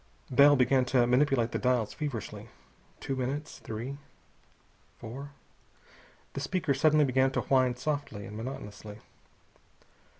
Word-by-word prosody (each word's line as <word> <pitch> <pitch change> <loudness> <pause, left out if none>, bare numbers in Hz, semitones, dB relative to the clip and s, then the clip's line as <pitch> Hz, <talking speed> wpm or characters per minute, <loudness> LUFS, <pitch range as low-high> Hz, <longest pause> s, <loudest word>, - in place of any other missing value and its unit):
Bell 140 +3 +7
began 130 0 +3
to 125 -1 +3
manipulate 125 -2 +2
the - - -2
dials 125 -4 +1
feverishly. 140 -8 -5 0.5
Two 135 - -3
minutes. 135 +4 -4
Three. 120 +6 -6 1.0
Four. 130 +5 -8 1.0
The - - -4
speaker 140 +1 0
suddenly 150 +2 +4
began 130 0 +3
to - - 0
whine 130 -2 +2
softly 130 -6 -3
and 105 - -9
monotonously. 105 -3 -7
130 Hz, 120 wpm, -29 LUFS, 120-140 Hz, 1.0 s, Bell